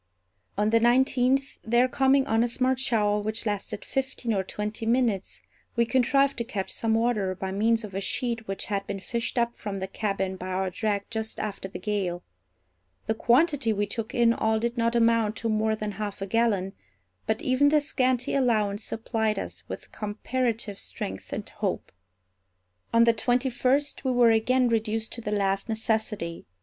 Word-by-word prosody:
On 210 +1 +2
the 230 - +5
nineteenth, 260 +3 +2
there 240 +3 +3
coming 270 +1 +3
on 225 -3 +2
a - - +2
smart 255 +2 0
shower 210 -5 +2
which 215 +2 -3
lasted 205 -1 -3
fifteen 260 -3 -2
or 195 - +1
twenty 210 +3 -4
minutes, 230 -5 0 0.3
we 235 -1 +3
contrived 275 +3 +2
to - - 0
catch 210 -5 -4
some 225 -1 0
water 220 -5 +1
by 190 +1 -4
means 225 +3 +2
of 205 -3 -8
a 195 - -2
sheet 230 +1 -1
which 195 0 -4
had 200 -1 -2
been 195 - -4
fished 235 +5 -3
up 235 0 +1
from 205 -2 -5
the 190 - -3
cabin 195 -1 -2
by 185 - -6
our 185 0 -1
drag 205 +1 -1
just 220 -1 -3
after 200 -2 -4
the 190 - -7
gale. 190 -5 -2 0.8
The 220 - +1
quantity 255 +2 +3
we 205 0 0
took 220 +2 -5
in 235 -1 +4
all 220 -1 +1
did 235 +2 -1
not 230 0 +1
amount 230 -2 +3
to 230 - -2
more 220 0 +1
than 215 -1 -4
half 205 0 -5
a 195 - -3
gallon; 200 -3 +1 0.5
but 220 +1 -1
even 260 +3 +4
this 295 -1 +2
scanty 255 -3 +1
allowance 215 -6 +1
supplied 220 -2 -1
us - - -5
with - - -8
comparative 220 0 -2
strength 95 0 -6
and - - -4
hope. - - -3 1.0
On 230 0 +5
the 230 0 +5
twenty 245 +3 +1
first 275 +5 +1
we 265 - 0
were 245 -2 +5
again 250 +3 +3
reduced 225 -1 -1
to 235 - -3
the 210 - -4
last 195 +1 0
necessity. 220 - -1
225 Hz, 180 wpm, -27 LUFS, 205-245 Hz, 1.0 s, the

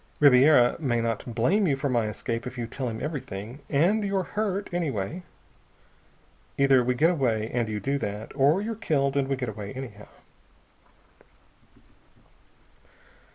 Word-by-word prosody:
Ribiera 135 -2 +6
may 125 -7 0
not 115 0 -3
blame 185 - +2
you 140 -3 +1
for 140 +1 -2
my 120 -4 +1
escape 115 +3 -4
if 125 +1 -8
you 120 - -2
tell 125 +2 -4
him 110 - -5
everything 125 - -6
and 180 +10 +2
you're 195 -1 0
hurt, 205 0 -2
anyway. 155 - -2 1.4
Either 135 -2 +4
we 125 +1 0
get 160 +7 +4
away, 115 -9 0
and 120 -2 0
you 105 -1 -2
do 140 +5 -1
that, 105 -2 -5
or 145 +8 +3
you're 225 +1 -3
killed 140 -10 0
and 140 -1 +1
we 135 - 0
get 125 -3 -4
away 105 -1 -7
anyhow." 120 -6 -8
135 Hz, 150 wpm, -26 LUFS, 115-155 Hz, 1.4 s, Ribiera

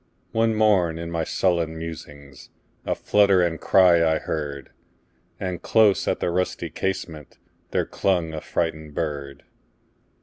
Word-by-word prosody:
One 115 0 +1
morn, 95 -7 +3
in 85 0 -6
my 85 -1 -1
sullen 85 -2 0
musings,A 70 -6 -8
flutter 100 -3 +3
and 80 -2 -2
cry 90 -3 +5
I 80 -1 +2
heard; 70 -4 -5 0.7
And 90 -2 -4
close 110 -3 +3
at - - 0
the 85 - -1
rusty 90 +1 -2
casementThere 85 -6 -5
clung 85 -4 0
a 80 - -5
frightened 80 -3 -3
bird. 70 -4 -4
85 Hz, 125 wpm, -24 LUFS, 80-95 Hz, 0.7 s, cry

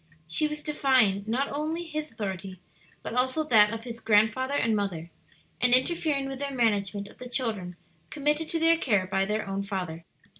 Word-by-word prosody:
She 235 - +1
was 300 0 -6
defying 255 -10 +2
riot 255 +5 0
only 310 +4 -2
his 310 -2 -5
authority, 190 -4 -5 0.4
but - - -5
also 260 +5 +1
that 215 -7 +5
of 225 0 -5
his 235 -1 -7
grandfather 225 +6 +2
and 230 -5 +2
mother, 175 -5 -3 0.5
and 250 0 +5
interfering 280 0 0
with 270 -1 -6
their 280 0 -2
management 205 -5 0
of - - -17
the 250 - -8
children 215 -9 -1 0.3
committed 300 +2 0
to 330 - 0
their 330 0 +4
care 205 - +2
by 195 +1 0
their 210 +1 -2
own 195 0 -2
father. 180 -5 -5
230 Hz, 180 wpm, -27 LUFS, 200-285 Hz, 0.5 s, that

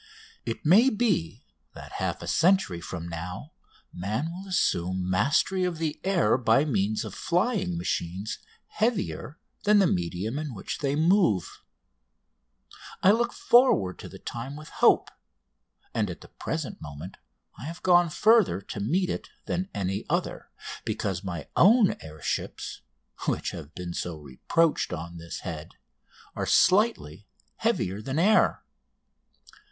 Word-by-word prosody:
It 115 - -4
may 210 - +6
be 215 - 0 0.3
that - - -10
half - - -3
a - - -7
century 175 - +2
from 85 -1 -6
now 90 - -6 0.4
man 110 - -2
will 190 +3 -8
assume 95 - 0
mastery 140 - +2
of 180 -2 -1
the 160 -2 -3
air 175 - +2
by 125 +4 +3
means 110 -6 0
of - - -7
flying 180 - 0
machines 90 +4 -3 0.3
heavier 215 -8 -2 0.3
than 210 0 +5
the 200 - +5
medium 90 - -1
in 150 -6 -5
which - - -5
they 140 -1 0
move. 160 - +2 1.4
I 190 - +8
look 235 +2 +1
forward 235 - +3
to - - -8
the - - -10
time 120 +4 -6
with 155 +1 -10
hope, - - +3 0.8
and 105 -3 0
at 85 - -7
the - - -13
present - - -5
moment 75 +5 -8 0.4
I 125 - -7
have 165 +3 -7
gone 175 -2 +5
further 215 - +4
to 100 +1 -7
meet 175 - 0
it - - -5 0.2
than 185 +2 -2
any 95 +1 -2
other, - - -2 0.3
because 95 -2 -2
my 85 -6 -5
own 210 +2 +6
air 80 -1 -11
ships - - -3 0.5
(which - - 0
have 75 +2 -9
been 90 -1 -5
so 85 -2 -4
reproached 75 - 0
on 85 0 -6
this 85 0 -7
head) 80 -4 -7 0.6
are - - -2
slightly 185 - +3 0.3
heavier 95 +3 0
than 130 +5 -4
the 165 - +3
air. 215 +3 +4
120 Hz, 145 wpm, -27 LUFS, -, 1.4 s, I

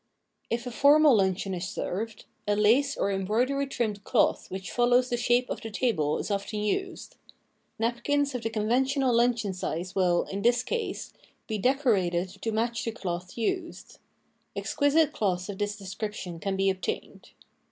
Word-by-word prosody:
If 235 +1 -2
a 245 - -4
formal 290 +2 +6
luncheon 190 0 0
is 180 0 -3
served, 215 +6 -4 0.2
a 205 - +2
lace 245 +8 +3
or 200 - 0
em 195 0 -1
broidery 255 +8 +1
trimmed 210 -6 -2
cloth - - +1
which 190 -2 -6
follows 245 +2 +3
the - - +2
shape 240 +1 +2
of - - -4
the 225 - -6
table 200 - 0
is - - -4
often 200 +2 -2
used. 380 - -3 0.6
Napkins 255 +5 0
of 250 - -3
the 225 - -2
conventional 250 +4 +1
luncheon 235 -4 +2
size 180 0 -4
will, 180 -2 +2
in 195 +1 -5
this 240 +2 +3
case, 470 -2 -3 0.3
be 215 -2 -3
decorated 195 -9 +2
to 225 - -1
match 230 +1 -1
the 230 - -2
cloth 180 -3 -5
used. 335 +8 -3 0.6
Exquisite 285 +2 +2
cloths 185 -2 -1
of 195 - -6
this 205 0 -1
description 195 -3 -6
can 195 +2 -2
be 195 0 +2
obtained. 190 0 -5
220 Hz, 165 wpm, -28 LUFS, 195-250 Hz, 0.6 s, formal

